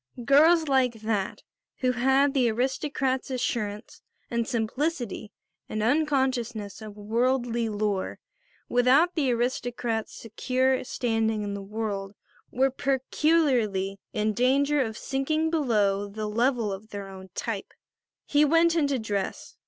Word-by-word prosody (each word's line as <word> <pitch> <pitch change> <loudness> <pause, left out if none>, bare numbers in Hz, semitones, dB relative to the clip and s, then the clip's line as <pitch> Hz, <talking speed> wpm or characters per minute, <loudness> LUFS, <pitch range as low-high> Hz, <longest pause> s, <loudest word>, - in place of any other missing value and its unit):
Girls 315 +4 +5
like 260 -3 +3
that, 215 -2 -2 0.4
who 255 -1 +3
had 265 +3 +3
the 255 -4 +3
aristocrat's 265 +3 -1
assurance 235 -5 -3 0.3
and 235 -1 0
simplicity 240 - -2 0.4
and 215 0 -2
unconsciousness 250 -6 0
of 215 -1 -9
worldly 235 +2 0
lore, 205 -2 -2 0.5
without 265 +8 +4
the 290 -6 +1
aristocrat's 240 -2 -2
secure 255 +3 0
standing 225 -3 -1
in 200 -1 -3
the 200 - -5
world, 200 -1 -4 0.3
were 265 +2 +2
peculiarly 260 - +1
in 215 0 0
danger 275 +5 +2
of 220 -3 -3
sinking 310 +4 -1
below 210 -10 +1
the 215 +2 -5
level 230 0 +1
of 205 +3 -9
their 200 -2 -6
own 190 -1 -11
type. - - -4 0.5
He 290 0 +3
went 330 +3 +4
in 310 -4 +2
to 280 -1 0
dress. 205 -4 -4
240 Hz, 125 wpm, -26 LUFS, 215-270 Hz, 0.5 s, Girls